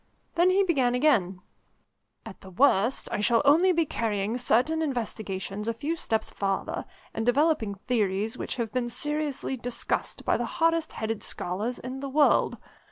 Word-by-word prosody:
Then 350 +2 +4
he 385 +2 +4
began 265 -9 +2
again: 195 -10 +2 0.8
"At - - -10
the 190 - -11
worst 230 +3 +2
I - - -1
shall 230 +4 +3
only 330 +6 +5
be 335 -2 +2
carrying 215 -4 -1
certain 255 +7 +2
investigations 210 - -3
a 230 - -1
few 300 +7 -2
steps 220 -8 -2
farther, 195 -1 -2 0.3
and 225 - -2
developing 245 -4 +2
theories 210 -1 -1
which - - -4
have 230 -3 -3
been 250 -2 -1
seriously 295 0 -2
discussed 245 0 -3
by - - +2
the - - -2
hardest 330 -1 +1
headed 220 -1 -3
scholars 210 +8 -3
in 255 +2 -6
the 275 0 -5
world. 290 +1 +3
245 Hz, 160 wpm, -27 LUFS, 215-295 Hz, 0.8 s, only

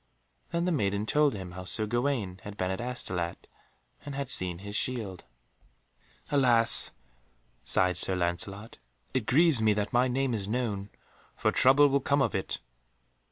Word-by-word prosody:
Then 170 +1 -1
the 180 - +1
maiden 100 - 0
told 150 +1 +2
him 95 -3 -7
how 90 +1 -8
Sir 90 +5 +1
Gawaine 120 -5 -1
had 105 0 -9
been 95 0 -1
at 95 - -3
Astolat 95 -9 -4 0.6
and 145 -1 -7
had 140 -2 -4
seen 90 -2 +2
his 100 +3 -8
shield. 105 -8 -2 1.1
"Alas!" 120 -5 +4 0.8
sighed 90 -2 +1
Sir 95 +1 +1
Lancelot, 95 +5 -3 0.3
"it 125 -5 -1
grieves 155 -3 +4
me 110 -1 +4
that 105 0 -3
my 125 +2 +3
name 130 0 0
is 100 -3 -1
known, 105 -4 -2 0.5
for - - +1
trouble 135 +3 +5
will 140 0 +2
come 140 +1 +1
of 115 - -1
it." 95 - -2
110 Hz, 160 wpm, -28 LUFS, 95-130 Hz, 1.1 s, trouble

